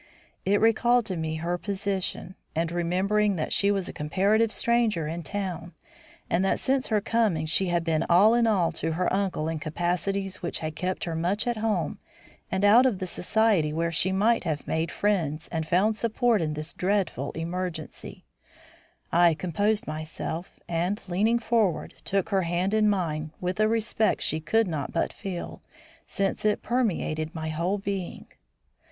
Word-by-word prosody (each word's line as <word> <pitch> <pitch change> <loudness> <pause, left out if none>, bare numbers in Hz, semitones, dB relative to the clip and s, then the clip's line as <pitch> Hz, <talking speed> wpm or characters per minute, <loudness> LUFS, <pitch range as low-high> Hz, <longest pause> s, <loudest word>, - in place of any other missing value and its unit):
It 200 +1 +3
recalled 235 +2 +4
to 190 - -3
me 160 -1 -2
her 170 +2 -2
position; 195 -2 -3 0.2
and 165 +1 0
remembering 190 +4 +1
that 155 - -2
she 200 - +3
was 195 -2 0
a - - -6
comparative 200 +9 +1
stranger 230 -10 +1
in 165 +2 -4
town, 180 -1 -5 0.5
and 180 - +1
that 195 - +2
since 270 0 0
her 215 -2 +2
coming 210 -8 +1
she 170 +5 +2
had 175 -1 +1
been 165 -1 +1
all 200 +6 +6
in 235 -1 +3
all 185 -6 +2
to 165 -1 -2
her 180 +3 0
uncle 190 -5 0
in 160 -1 -2
capacities 180 +5 -2
which 170 - -1
had 155 -1 -4
kept 185 +3 -2
her 165 -2 -3
much 180 +6 0
at 240 -2 -1
home 220 -1 -1 0.5
and 190 +1 +1
out 235 +6 +7
of 230 -7 0
the 185 - -4
society 185 -3 +2
where 165 +2 -1
she 170 +3 +1
might 220 +5 +2
have 155 -5 -3
made 160 +1 -1
friends 165 -7 -1
and 160 -2 -3
found 200 +6 +2
support 230 -1 +1
in 155 -2 -1
this 155 +2 -5
dreadful 185 -8 -1
emergency, 170 0 -5 0.9
I 170 -1 +5
composed 205 +7 0
myself, 155 +2 -5
and, 175 +5 -1
leaning 210 +6 +2
forward, 225 -6 0
took 195 -1 0
her 195 -2 +2
hand 175 +3 -1
in 215 -1 +4
mine 160 -6 -1
with 180 +3 -3
a 215 - +4
respect 225 0 +1
she 155 - 0
could 220 +7 +2
not 155 -5 -3
but 165 - -1
feel, 190 -4 -6 0.5
since 195 -1 -1
it 210 -1 +1
permeated 175 -9 -1
my 160 -1 -3
whole 170 +6 -1
being. 195 -2 -4
185 Hz, 170 wpm, -26 LUFS, 165-210 Hz, 0.9 s, out